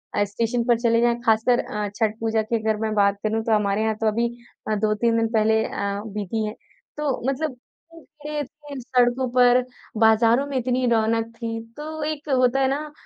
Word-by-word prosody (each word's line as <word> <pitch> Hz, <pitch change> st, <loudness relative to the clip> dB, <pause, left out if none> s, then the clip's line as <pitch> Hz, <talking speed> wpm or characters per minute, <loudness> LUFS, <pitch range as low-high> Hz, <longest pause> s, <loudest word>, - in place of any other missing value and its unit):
अ, 205 Hz, -, +3 dB
station 230 Hz, +4 st, -1 dB
पर 235 Hz, -1 st, +2 dB
चले 230 Hz, -1 st, +2 dB
जाएँ 240 Hz, 0 st, +2 dB
खासकर 225 Hz, +2 st, +3 dB
अ, 210 Hz, -1 st, -3 dB
छठ 215 Hz, -1 st, 0 dB
पूजा 225 Hz, -1 st, 0 dB
की 220 Hz, +2 st, -2 dB
अगर 220 Hz, -1 st, +1 dB
मैं 220 Hz, -1 st, -1 dB
बात 200 Hz, -1 st, +2 dB
करूँ 220 Hz, +1 st, 0 dB
तो 225 Hz, -, +1 dB
हमारे 205 Hz, 0 st, 0 dB
यहाँ 220 Hz, 0 st, 0 dB
तो 220 Hz, -, +2 dB
अभी 230 Hz, +2 st, +1 dB, 0.4 s
अ, -, -, +2 dB
2-3 215 Hz, +2 st, +1 dB
दिन 225 Hz, 0 st, +2 dB
पहले 220 Hz, 0 st, +3 dB
अ, 200 Hz, 0 st, -3 dB
बीती 210 Hz, +1 st, -3 dB
है 210 Hz, +1 st, -5 dB, 0.4 s
तो 295 Hz, -3 st, -1 dB
मतलब 275 Hz, -1 st, -3 dB, 0.7 s
इतनी 300 Hz, -, -4 dB
भीड़ 300 Hz, -, -3 dB
रहती 295 Hz, +1 st, -7 dB
है 275 Hz, -, -5 dB
सड़कों 250 Hz, 0 st, +1 dB
पर 245 Hz, 0 st, +5 dB, 0.4 s
बाज़ारों 225 Hz, +4 st, +4 dB
में 280 Hz, -, -5 dB
इतनी 255 Hz, 0 st, 0 dB
रौनक 225 Hz, 0 st, +2 dB
थी, 225 Hz, -1 st, -4 dB, 0.2 s
तो 310 Hz, +1 st, -5 dB
एक 305 Hz, 0 st, -4 dB
होता 255 Hz, 0 st, +3 dB
है 265 Hz, -, +3 dB
ना, 295 Hz, +3 st, -3 dB
230 Hz, 200 wpm, -23 LUFS, 220-255 Hz, 0.7 s, पर